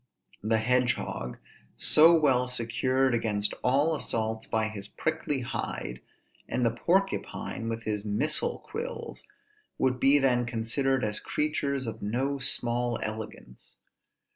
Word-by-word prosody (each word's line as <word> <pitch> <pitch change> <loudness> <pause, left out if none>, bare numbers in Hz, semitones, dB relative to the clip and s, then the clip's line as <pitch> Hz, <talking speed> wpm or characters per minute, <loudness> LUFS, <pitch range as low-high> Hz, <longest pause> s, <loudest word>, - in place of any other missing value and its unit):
The 110 +1 +2
hedge 125 +1 +2
hog, 60 - -5 0.4
so 165 +3 +6
well 130 -4 +3
secured 125 +2 +1
against 105 -3 0
all 145 +6 +3
assaults 110 -5 -1
by 110 0 +1
his 105 -2 -6
prickly 150 +2 -2
hide, 65 - -4 0.5
and 125 - 0
the 115 - +3
porcupine 170 -5 -1
with 115 0 -4
his 105 -2 -2
missile 140 +9 +1
quills, 485 +3 -6 0.5
would 130 -1 +1
be 140 +3 +6
then 125 -3 +2
considered 125 +3 0
as 105 0 -1
creatures 140 -3 -1
of 110 -1 -5
no 130 +7 -1
small 120 -2 0
elegance. 110 - -7
125 Hz, 125 wpm, -28 LUFS, 110-135 Hz, 0.5 s, so